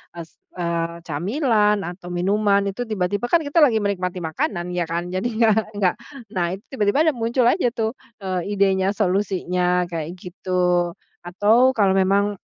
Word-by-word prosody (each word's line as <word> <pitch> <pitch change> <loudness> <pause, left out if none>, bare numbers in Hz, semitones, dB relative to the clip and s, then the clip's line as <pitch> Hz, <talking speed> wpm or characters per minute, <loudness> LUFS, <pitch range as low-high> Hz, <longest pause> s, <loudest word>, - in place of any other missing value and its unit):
s 165 -1 -10 0.2
eee, 170 -1 -3
camilan, 210 - +1
atau 175 0 -8
minuman, 200 +3 +1
itu 200 +5 -4
tiba-tiba 205 +1 -1
kan 335 +4 +2
kita 290 +3 +1
lagi 235 -9 +4
menikmati 185 -3 -2
makanan, 175 +2 -2
ya 175 -2 -2
kan. 170 +2 -3
Jadinya 220 +4 +1
nggak 220 +1 +1 0.2
nggak 180 - +3 0.4
naik, 180 -1 -1
tiba-tiba 255 +3 +2
dah - - -12
muncul 235 +2 0
aja 245 +5 +3
tuh, 220 -1 -1 0.3
eee, 190 +1 -2
idenya, 195 0 +2
solusinya, 180 -2 0
kayak 165 +1 -4
gitu. 180 -1 -1 0.3
Atau 220 +8 +3
kalau 200 -3 +3
memang, 195 +1 +1
195 Hz, 150 wpm, -22 LUFS, 180-215 Hz, 0.4 s, lagi